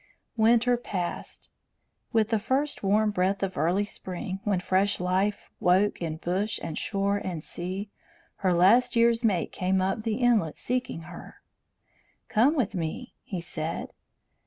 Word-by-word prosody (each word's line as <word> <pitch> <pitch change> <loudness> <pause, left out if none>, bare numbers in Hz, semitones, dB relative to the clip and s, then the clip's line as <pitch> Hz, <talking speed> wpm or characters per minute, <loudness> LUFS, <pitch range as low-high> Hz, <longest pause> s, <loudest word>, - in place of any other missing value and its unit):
Winter 235 +2 +4
passed. 185 -7 -5 0.6
With 220 -3 +2
the 225 -2 +2
first 270 +7 -1
warm 210 +2 +2
breath 195 +1 0
of 190 -1 -2
early 175 +7 +1
spring, 190 0 -6
when 200 -3 +1
fresh 190 +2 +1
life 190 +3 0
woke 185 +3 +3
in 160 -2 -3
bush 190 +6 -1
and 160 -2 -4
shore 200 +2 0
and 175 -6 -5
sea, 190 +4 -5 0.5
her 190 -2 +1
last 190 +10 +4
year's 235 0 +3
mate 195 -7 +1
came 190 +1 0
up 190 +3 0
the 220 -1 -1
inlet 230 -10 +2
seeking 250 -8 -2
her. 170 +1 -11 0.9
"Come 250 +7 +4
with 245 -9 0
me," 180 +8 -4
he 185 -4 -5
said. 165 -1 -4
195 Hz, 145 wpm, -27 LUFS, 180-225 Hz, 0.9 s, Winter